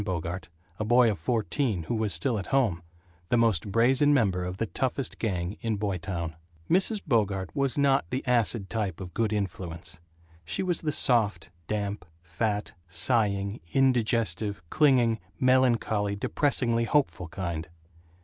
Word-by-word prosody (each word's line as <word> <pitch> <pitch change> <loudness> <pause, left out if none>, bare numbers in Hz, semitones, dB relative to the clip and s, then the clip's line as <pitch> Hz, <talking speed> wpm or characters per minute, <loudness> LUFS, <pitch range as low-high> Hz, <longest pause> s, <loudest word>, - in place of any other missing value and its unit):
Bogart, 90 -2 -4 0.3
a - - 0
boy 120 +1 +5
of 100 - -5
fourteen 115 - -1
who 80 - -3
was 110 -2 0
still 120 -1 0
at 95 - -6
home, 115 -11 +1 0.5
the 120 - +3
most 105 -5 +2
brazen 130 +7 +4
member 95 -8 +1
of 90 +1 -4
the 115 - 0
toughest 130 +3 -3
gang 95 -2 -2
in 115 -2 -1
Boytown. 90 -5 -3 0.3
Mrs. 195 - +2
Bogart 100 - 0
was 140 -1 0
not 135 -10 +2
the 130 - -3
acid 115 -4 +1
type 100 -7 -3
of 90 -2 -8
Good 115 -2 0
Influence. 90 -6 -4 0.4
She 80 - -3
was 175 -3 0
the 155 - -1
soft, 105 - +1 0.2
damp, 105 -2 -2 0.2
fat, 105 +5 -2
sighing, 100 +2 0 0.2
indigestive, 115 -7 +1
clinging, 125 -7 +4 0.2
melancholy, 120 -5 +2
depressingly 115 0 +1
hopeful 135 - +1
kind. 85 -2 -4
110 Hz, 140 wpm, -27 LUFS, 95-125 Hz, 0.5 s, boy